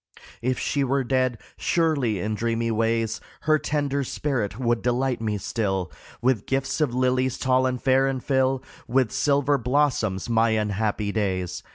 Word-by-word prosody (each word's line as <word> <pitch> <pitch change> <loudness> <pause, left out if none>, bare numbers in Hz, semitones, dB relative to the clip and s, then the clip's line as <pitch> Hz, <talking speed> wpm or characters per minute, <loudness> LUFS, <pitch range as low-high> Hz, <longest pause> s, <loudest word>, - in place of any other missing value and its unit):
If 125 +1 0
she 140 -1 0
were 135 +1 +1
dead, 130 -1 +1 0.2
surely 145 - +1
in 110 +2 -2
dreamy 115 +1 -1
ways 115 0 0 0.2
Her 155 0 +3
tender 140 -2 -1
spirit 125 -7 -2
would 120 -2 +1
delight 125 0 0
me 105 -2 -1
still, 95 -5 -2 0.3
With 125 -5 +1
gifts 135 +3 -1
of 130 -5 +1
lilies, 130 0 +1
tall 130 0 +2
and 125 -1 -2
fair, 135 +1 +3
and 130 -2 -2
fill 130 -1 +1 0.2
With 125 -2 +2
silver 145 -1 +2
blossoms 125 -7 +1
my 115 0 +3
unhappy 105 -1 0
days. 95 -4 -2
125 Hz, 155 wpm, -25 LUFS, 110-135 Hz, 0.3 s, Her